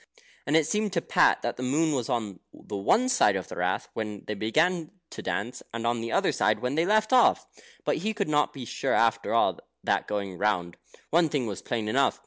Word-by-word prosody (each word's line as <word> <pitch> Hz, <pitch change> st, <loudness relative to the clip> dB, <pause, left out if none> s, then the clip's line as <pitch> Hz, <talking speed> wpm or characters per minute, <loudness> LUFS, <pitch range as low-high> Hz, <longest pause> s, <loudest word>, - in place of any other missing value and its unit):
And 150 Hz, +2 st, +4 dB
it 160 Hz, -, +3 dB
seemed 210 Hz, +4 st, -1 dB
to 170 Hz, -, +2 dB
Pat -, -, +3 dB
that -, -, -2 dB
the -, -, -6 dB
moon 155 Hz, +5 st, +1 dB
was 125 Hz, -3 st, -2 dB
on 110 Hz, -7 st, -2 dB
the 105 Hz, -, -9 dB
one 215 Hz, -, +2 dB
side 175 Hz, -, +3 dB
of 95 Hz, -, -4 dB
the -, -, -8 dB
Rath -, -, -1 dB
when 105 Hz, -2 st, -5 dB
they 105 Hz, -, -3 dB
began 155 Hz, -, +1 dB, 0.2 s
to -, -, -7 dB
dance, 100 Hz, +7 st, -3 dB
and 115 Hz, 0 st, -4 dB
on 120 Hz, 0 st, 0 dB
the 115 Hz, 0 st, -4 dB
other -, -, +2 dB
side 105 Hz, 0 st, +2 dB
when 125 Hz, +4 st, -2 dB
they 165 Hz, +4 st, +1 dB
left 215 Hz, +3 st, +2 dB
off; 250 Hz, -, +5 dB, 0.4 s
but -, -, +1 dB
he 215 Hz, +7 st, -1 dB
could 210 Hz, -2 st, -2 dB
not 150 Hz, -1 st, +2 dB
be 130 Hz, -3 st, -8 dB
sure -, -, -2 dB
after 115 Hz, 0 st, +2 dB
all 115 Hz, -, +2 dB, 0.2 s
that -, -, 0 dB
going 100 Hz, -3 st, -4 dB
round. 90 Hz, -4 st, 0 dB, 0.3 s
One 165 Hz, 0 st, +4 dB
thing 140 Hz, -4 st, -1 dB
was 100 Hz, -4 st, -5 dB
plain 115 Hz, -3 st, -3 dB
enough. 135 Hz, +6 st, +1 dB
120 Hz, 225 wpm, -27 LUFS, 105-160 Hz, 0.4 s, off